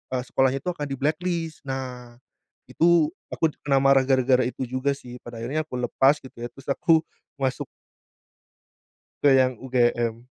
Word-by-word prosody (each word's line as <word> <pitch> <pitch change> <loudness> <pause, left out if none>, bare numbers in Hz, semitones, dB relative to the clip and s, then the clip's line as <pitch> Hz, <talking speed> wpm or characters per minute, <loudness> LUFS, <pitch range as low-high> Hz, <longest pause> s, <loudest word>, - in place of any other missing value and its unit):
eee, 125 - -1
sekolahnya 130 +1 +1
itu 180 - -1
akan 145 -4 -5
di-blacklist 160 +4 -2
nah 125 -2 -6 0.6
itu 165 -2 +4 0.2
aku 160 -2 0 0.2
kena 135 -1 +3
marah 135 -1 +5
gara-gara 130 -2 +3
itu 130 - -5
juga 130 +3 -1
sih 125 -2 -11
pada 115 -1 -9
akhirnya 155 +5 -2
aku 125 - -7
lepas 135 +4 +2
gitu 130 -2 -13
ya 120 - -4
terus 135 +2 -7
aku 160 +3 +3 0.3
masuk 135 -2 -2 1.6
ke 145 - +7
yang 130 -1 +3
UGM. 120 -2 0
135 Hz, 150 wpm, -25 LUFS, 125-145 Hz, 1.6 s, ke